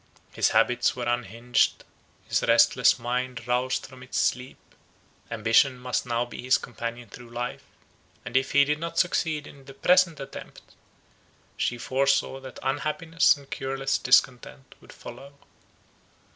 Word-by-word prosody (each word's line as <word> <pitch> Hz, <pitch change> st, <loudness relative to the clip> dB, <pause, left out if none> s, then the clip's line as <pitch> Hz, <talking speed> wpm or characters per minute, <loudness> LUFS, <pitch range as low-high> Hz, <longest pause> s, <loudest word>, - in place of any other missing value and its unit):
His -, -, +1 dB
habits 120 Hz, +2 st, +2 dB
were 125 Hz, -, -4 dB
unhinged; 120 Hz, 0 st, 0 dB, 0.4 s
his -, -, +1 dB
restless -, -, +4 dB
mind 125 Hz, 0 st, -3 dB
roused 125 Hz, +1 st, 0 dB
from 130 Hz, -1 st, -14 dB
its 130 Hz, -, -6 dB
sleep, 125 Hz, +1 st, -1 dB, 0.7 s
ambition 115 Hz, +4 st, +3 dB
must 125 Hz, 0 st, -3 dB
now 120 Hz, 0 st, 0 dB
be 120 Hz, -, -9 dB
his 130 Hz, +1 st, +3 dB
companion 120 Hz, 0 st, -7 dB
through 120 Hz, +3 st, -13 dB
life; 120 Hz, +1 st, -5 dB, 0.6 s
and 120 Hz, -, -8 dB
if 135 Hz, 0 st, +1 dB
he 140 Hz, 0 st, +6 dB
did 150 Hz, +1 st, -1 dB
not 170 Hz, +1 st, -5 dB
succeed 160 Hz, -4 st, 0 dB
in 140 Hz, -1 st, -14 dB
his 135 Hz, 0 st, -13 dB
present 180 Hz, -2 st, +3 dB
attempt, 135 Hz, 0 st, -10 dB, 0.9 s
she 120 Hz, -, -1 dB
foresaw 135 Hz, +2 st, 0 dB
that 130 Hz, -1 st, -11 dB
unhappiness 150 Hz, +4 st, +1 dB
and 140 Hz, -1 st, -17 dB
cureless 135 Hz, 0 st, -2 dB
discontent 130 Hz, +1 st, +1 dB
would -, -, -15 dB
follow. 140 Hz, +1 st, -11 dB
130 Hz, 140 wpm, -26 LUFS, 120-140 Hz, 0.9 s, he